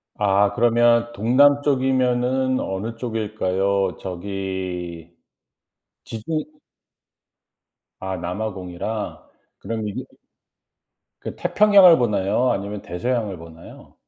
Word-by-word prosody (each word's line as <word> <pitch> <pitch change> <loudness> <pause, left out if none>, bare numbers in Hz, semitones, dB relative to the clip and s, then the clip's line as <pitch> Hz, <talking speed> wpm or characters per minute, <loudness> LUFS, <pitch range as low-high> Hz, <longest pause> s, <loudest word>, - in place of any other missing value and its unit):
아 100 0 +2
그러면 120 0 +3
동남쪽이면 130 0 +2
어느 105 +5 -4
쪽일까요? 100 -5 -1
저기 90 -3 -5 0.9
지주 150 +8 -4 1.6
아 95 -1 -4
남아공이라 95 +2 -5 0.3
그럼 110 -2 -4
이게 100 - -5 1.2
그 - - -6
태평양을 200 -5 +6
보나요 105 +1 +1
아니면 100 +1 -4
대서양을 110 0 -3
보나요? 80 0 -14
105 Hz, 200 characters per minute, -22 LUFS, 95-125 Hz, 1.6 s, 태평양을